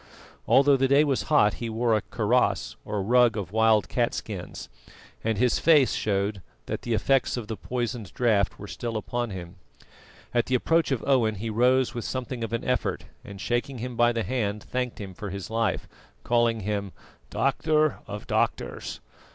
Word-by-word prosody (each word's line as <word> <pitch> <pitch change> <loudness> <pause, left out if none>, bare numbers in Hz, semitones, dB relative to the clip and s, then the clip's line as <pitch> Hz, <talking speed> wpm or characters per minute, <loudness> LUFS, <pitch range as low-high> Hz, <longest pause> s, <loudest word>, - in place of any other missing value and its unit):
Although 140 +1 +5
the 135 0 +2
day 140 +3 +5
was 140 -4 +1
hot, 105 -9 +5
he 115 - -2
wore 115 +1 +1
a 110 - +1
kaross 105 -2 0
or 105 -2 -3
rug 120 +1 +4
of 95 -3 -4
wild 110 -2 +3
catskins, - - -3 0.6
and 110 -1 0
his 125 +1 +2
face 150 -5 +5
showed 100 -1 -1 0.2
that - - -4
the 120 -2 -1
effects 135 +2 +1
of 115 -3 -5
the 110 - -4
poisoned 120 -5 -4
draught 110 -5 +2
were 105 - -8
still 115 +2 -4
upon 120 +2 -3
him. 90 -1 -8 0.8
At 120 -1 +1
the 130 - +1
approach 165 +5 +2
of 135 -5 -1
Owen 120 -6 +3
he 110 +3 -4
rose 125 +2 +3
with 120 -2 -4
something 125 -2 -4
of 115 - -4
an 115 - -2
effort, 125 -1 -1 0.2
and, 100 -1 -10
shaking 120 +5 -2
him 125 +1 -5
by 120 0 +4
the 115 -1 -1
hand, 105 -5 -2
thanked 125 -1 -3
him 100 -2 -7
for 100 +2 -6
his 100 +2 -6
life, 115 -3 0 0.4
calling 120 -2 +2
him 100 -1 -3 0.4
"doctor 155 +2 +1
of - - -7
doctors." - - -2
115 Hz, 175 wpm, -26 LUFS, 105-125 Hz, 0.8 s, Although